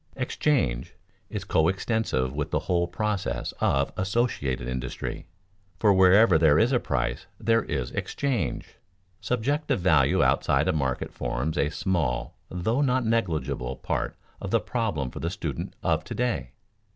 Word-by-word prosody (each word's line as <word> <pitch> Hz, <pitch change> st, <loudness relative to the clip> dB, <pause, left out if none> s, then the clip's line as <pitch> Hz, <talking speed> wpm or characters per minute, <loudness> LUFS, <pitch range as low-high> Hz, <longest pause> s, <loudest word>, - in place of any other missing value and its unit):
Exchange 130 Hz, -, 0 dB, 0.3 s
is -, -, -4 dB
coextensive 80 Hz, -, +1 dB
with 75 Hz, 0 st, -2 dB
the -, -, 0 dB
whole 85 Hz, -1 st, +1 dB
process 90 Hz, -, -2 dB
of 70 Hz, 0 st, +1 dB
associated 95 Hz, -, -1 dB
industry; 65 Hz, +4 st, -4 dB, 0.5 s
for 105 Hz, 0 st, +4 dB
wherever 95 Hz, -1 st, +6 dB
there 75 Hz, -2 st, +5 dB
is 115 Hz, +7 st, +4 dB
a 125 Hz, -, +3 dB
price, -, -, -2 dB
there 115 Hz, 0 st, +3 dB
is 65 Hz, -9 st, -3 dB
exchange. 140 Hz, -4 st, -2 dB, 0.4 s
Subjective 125 Hz, +6 st, 0 dB
value 85 Hz, -4 st, +4 dB
outside 70 Hz, +3 st, +2 dB
a 95 Hz, -, +2 dB
market 65 Hz, -4 st, -2 dB
forms 75 Hz, +6 st, -2 dB
a 75 Hz, -, +1 dB
small, 75 Hz, -10 st, -1 dB
though 110 Hz, +9 st, 0 dB
not 130 Hz, -3 st, +2 dB
negligible, 85 Hz, -, -1 dB
part -, -, -3 dB, 0.2 s
of -, -, -4 dB
the -, -, +3 dB
problem 80 Hz, -, -2 dB
for -, -, -7 dB
the 85 Hz, -, -2 dB
student 80 Hz, -7 st, -5 dB
of -, -, +1 dB
to -, -, -6 dB
day. 90 Hz, -, -1 dB
85 Hz, 140 wpm, -26 LUFS, -, 0.5 s, wherever